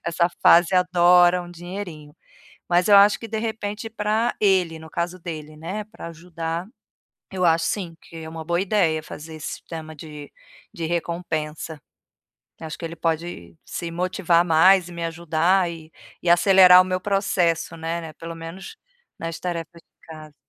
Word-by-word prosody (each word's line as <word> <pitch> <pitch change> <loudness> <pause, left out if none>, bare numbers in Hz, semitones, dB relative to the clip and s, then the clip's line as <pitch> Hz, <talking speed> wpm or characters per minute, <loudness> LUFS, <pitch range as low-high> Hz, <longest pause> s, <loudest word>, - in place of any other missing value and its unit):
Essa 170 +1 +1
fase 175 +2 +6
adora 180 0 +5
um 175 - -11
dinheirinho. 175 -4 -8 0.5
Mas 175 0 +2
eu 205 - +7
acho 200 +1 +6
que, 230 - -7
de 220 0 -3
repente, 220 -1 -4
pra 220 +2 -1
ele, 185 -5 +2
no 160 0 -13
caso 175 +2 -3
dele, 155 -3 -8
né, 190 +7 -5
pra 215 -5 -10
ajudar, 165 +1 -5 0.6
eu 185 -1 -4
acho, 165 -1 +3
sim, 180 -5 -3
que 165 - -14
é 160 0 -8
uma 160 0 -7
boa 170 +2 0
ideia 180 -6 +1
fazer 155 +1 -10
esse 155 -1 -7
sistema 160 -1 -8
de 150 -1 -10 0.4
de 165 - -5
recompensa. 160 -2 -3 0.8
Acho 160 -1 -6
que 170 - -6
ele 165 +1 -6
pode 160 - -3
se 170 - -5
motivar 175 0 +1
mais 180 +3 +5
e - - -11
me 170 0 -5
ajudar, 170 +2 +1
eh, 160 -1 -11 0.3
e 175 - -1
acelerar 185 0 +7
o 185 - -1
meu 185 0 -2
processo, 190 -5 0
né 165 +1 -4
né, 160 -1 -9
pelo 165 +1 -8
menos 165 - -9 0.4
nas 165 -1 -5
tarefas 170 -1 -5
de - - -29
casa. 155 -2 -11
170 Hz, 165 wpm, -23 LUFS, 160-185 Hz, 0.8 s, eu